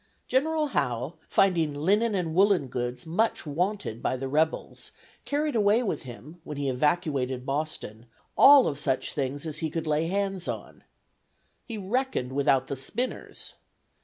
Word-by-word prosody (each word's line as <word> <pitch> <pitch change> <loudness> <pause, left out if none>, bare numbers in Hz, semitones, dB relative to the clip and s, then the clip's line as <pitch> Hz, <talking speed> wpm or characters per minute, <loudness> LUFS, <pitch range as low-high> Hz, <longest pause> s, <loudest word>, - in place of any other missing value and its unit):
General 305 +3 +1
Howe, 125 - -1 0.2
finding 165 -6 +2
"Linnen 205 +9 +2
and 170 -4 -1
Woollen 185 -6 +3
Goods 125 +2 -4
much 190 +7 0
wanted 175 - -2
by 130 - 0
the 135 +1 -4
Rebels," 155 +4 -1 0.3
carried 295 -1 -1
away 215 +2 +3
with 215 - -2
him, 140 +7 -11
when 150 -2 -7
he 140 -1 -1
evacuated 135 -2 0
Boston, 135 -6 -4 0.3
all 280 -2 +8
of 140 -2 -2
such 135 -3 -1
things 140 +1 -3
as 155 -1 -4
he 160 - -1
could 165 +1 -3
lay 155 +1 +1
hands 195 -1 -2
on. - - -6 0.8
He 230 - -6
reckoned 210 - -1
without 135 -2 +3
the 140 - -4
spinners! 220 - -4
160 Hz, 150 wpm, -27 LUFS, 135-200 Hz, 0.8 s, all